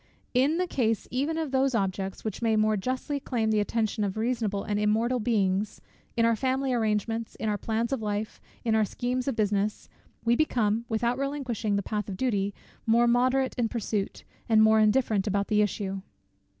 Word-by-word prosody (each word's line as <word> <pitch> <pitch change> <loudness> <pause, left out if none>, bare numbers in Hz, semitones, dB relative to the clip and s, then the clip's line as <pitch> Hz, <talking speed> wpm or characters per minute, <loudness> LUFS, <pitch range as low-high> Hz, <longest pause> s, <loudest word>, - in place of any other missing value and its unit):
In 270 +6 +3
the 365 - +1
case 225 - 0
even 285 +6 -1
of 315 -4 -2
those 265 -1 +2
objects, 195 -1 -2
which 215 0 -4
may 225 -2 +2
more 215 0 +3
justly 255 +7 -2
claim 230 -5 -1
the 215 - +3
attention 215 0 0
of 200 0 -2
reasonable 220 -3 -1
and 205 -1 -1
immortal 225 +4 +2
beings; 205 -3 0 0.4
in 230 - +4
our 230 0 +3
family 260 +3 0
arrangements, 225 0 -1
in 220 - -4
our 210 -1 +1
plans 230 +3 -1
of 260 - -2
life, 210 0 -3 0.2
in 225 - +2
our 220 0 +4
schemes 245 +5 -2
of 270 - 0
business, 210 -1 0 0.4
we 235 +1 +4
become, 235 -6 +1
without 235 +3 0
relinquishing 260 -7 -1
the 200 - 0
path 210 0 -3
of 190 - -5
duty, 205 -5 0 0.4
more 235 +2 +5
moderate 255 +2 +2
in 230 -2 +1
pursuit, 210 -3 -3 0.3
and 220 -1 +6
more 220 0 +5
indifferent 215 -2 +2
about 200 0 0
the 210 -1 +3
issue. 195 -2 -2
225 Hz, 185 wpm, -27 LUFS, 210-250 Hz, 0.4 s, and